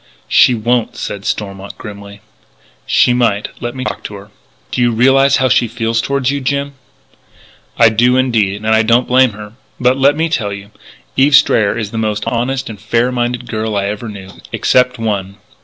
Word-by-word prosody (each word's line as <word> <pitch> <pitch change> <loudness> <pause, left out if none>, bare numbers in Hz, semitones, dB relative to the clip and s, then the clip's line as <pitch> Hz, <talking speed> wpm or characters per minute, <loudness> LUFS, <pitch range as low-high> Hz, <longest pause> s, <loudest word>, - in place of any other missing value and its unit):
"She 125 - +4
won't," 120 +1 -1
said 100 0 -6
Stormont 100 -1 -5
grimly. 100 -1 -10 0.7
"She 125 - +3
might. 115 -4 0
Let 120 +1 -4
me 130 - -4
talk - - -5
to 105 - -6
her." 100 +1 -12 0.4
"Do - - -1
you 120 - +3
realise 135 +4 +3
how 130 - +2
she 120 -1 +2
feels 115 0 -1
toward 140 0 -1
you, 140 0 -3
Jim?" 140 +1 -2 1.0
"I 115 -1 +6
do, 120 +3 +2
indeed. 115 -7 +1
And - - 0
I 110 - +4
don't 115 +3 +2
blame 130 -2 +3
her. 105 +1 -10 0.3
But 125 +2 +2
let 140 +2 +3
me 165 +1 +1
tell 105 -11 -2
you; 100 +1 -10 0.5
Eve 140 +2 +5
Strayer 115 -7 +3
is 110 -3 -4
the 115 - -3
most 105 -1 -2
honest 125 +3 -2
and 105 -4 -9
fair 115 +3 0
minded 120 0 -2
girl 110 -1 -3
I 100 -1 0
ever 105 +2 -5
knew.... 95 -2 -10 0.2
Except 125 0 +2
one.... 100 -4 -3
115 Hz, 190 wpm, -15 LUFS, 105-125 Hz, 1.0 s, I